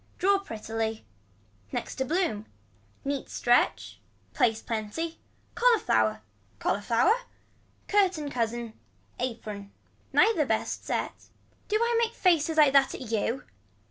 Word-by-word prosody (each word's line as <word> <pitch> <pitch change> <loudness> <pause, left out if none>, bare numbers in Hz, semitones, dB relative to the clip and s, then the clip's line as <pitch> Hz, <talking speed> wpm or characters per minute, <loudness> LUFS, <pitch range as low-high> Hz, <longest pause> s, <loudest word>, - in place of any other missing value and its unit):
Draw 395 +2 +3
prettily. 225 - -4 0.7
Next - - -3
to 265 - 0
a - - -10
bloom. 310 - 0 0.6
Neat 280 -1 -2
stretch. 100 - +1 0.3
Place 225 -2 +2
plenty. 230 +11 -4 0.3
Cauliflower. 415 - +3 0.4
Cauliflower. 230 - +2 0.7
Curtain 365 -8 +2
cousin. 235 -2 -2 0.5
Apron. 210 -5 -5 0.4
Neither 345 -11 +4
best 220 - -1
set. - - -3 0.4
Do 425 - 0
I 470 +1 +2
make 465 0 0
faces 325 -3 +2
like 295 -3 +6
that 275 -1 +4
at 245 -4 -8
you. 230 +4 0
255 Hz, 110 wpm, -28 LUFS, 220-345 Hz, 0.7 s, like